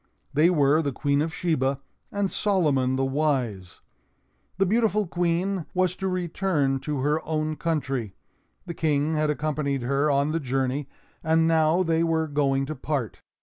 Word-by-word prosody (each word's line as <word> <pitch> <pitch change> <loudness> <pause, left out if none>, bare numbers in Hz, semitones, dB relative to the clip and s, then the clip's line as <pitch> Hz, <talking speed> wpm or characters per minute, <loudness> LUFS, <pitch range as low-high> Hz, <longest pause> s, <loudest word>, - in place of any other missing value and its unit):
They 155 +4 +4
were 150 -2 +3
the 145 -3 -1
Queen 140 +2 0
of 160 +1 -1
Sheba 140 -6 0 0.3
and 200 -1 -1
Solomon 145 -11 +1
the 135 0 0
Wise. 130 - -1 0.8
The 195 - +3
beautiful 215 0 +2
Queen 175 +1 -1
was 185 0 +1
to 190 - -2
return 175 -6 0
to 145 -1 -3
her 150 +3 0
own 155 0 -2
country; 135 - -2 0.5
the 170 - -5
King 155 -1 0
had 155 -1 +1
accompanied 150 -3 -1
her 140 +4 +1
on 140 +1 +2
the 165 - 0
journey, 135 0 -2 0.3
and 160 +1 +3
now 160 +2 +3
they 165 -1 +1
were 160 -1 +1
going 140 -2 +1
to 155 +2 -5
part. 135 -4 -3
155 Hz, 155 wpm, -25 LUFS, 140-165 Hz, 0.8 s, They